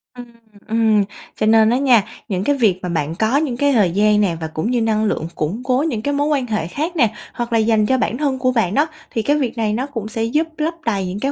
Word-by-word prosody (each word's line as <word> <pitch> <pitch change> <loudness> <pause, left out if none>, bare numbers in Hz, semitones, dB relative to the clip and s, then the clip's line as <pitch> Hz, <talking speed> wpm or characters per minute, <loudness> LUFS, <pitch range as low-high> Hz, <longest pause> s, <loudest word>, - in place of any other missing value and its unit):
Ừm, 245 -1 -9 0.4
ừm, 220 -2 +3 0.4
cho - - +1
nên 220 0 +5
á 240 - +2
nha, 255 -6 +4 0.2
những 190 -4 -2
cái 285 +6 +2
việc 215 -9 +2
mà 180 - -3
bạn 160 -1 -2
có 220 +8 +1
những 285 -5 -1
cái 285 +1 +2
thời 205 -8 +3
gian 210 +3 +3
nè 185 -5 +1
và 160 - -2
cũng 160 +9 -3
như 245 -2 +1
năng 220 -1 +1
lượng 165 -6 -1
củng 175 +10 -3
cố 255 +2 +1
những 230 -9 -2
cái 285 +5 -1
mối 285 +1 0
quan 280 -4 0
hệ 215 -7 -2
khác 310 - -3
nè, 235 -9 +2 0.2
hoặc 240 -1 -4
là 225 - +4
dành 220 -1 +2
cho 260 +4 +2
bản 245 - -1
thân 275 -2 -1
của 255 0 +2
bạn 225 -7 0
đó. 295 +6 +2 0.2
Thì 225 - -1
cái 290 +6 +1
việc 255 -4 -2
này 215 -2 0
nó 245 +5 -1
cũng 235 -7 -6
sẽ 225 0 -3
giúp 300 +8 0
lấp 315 +2 -1
đầy 200 -5 0
những 185 +2 -4
cái 275 +5 -1
230 Hz, 275 wpm, -19 LUFS, 210-265 Hz, 0.4 s, nên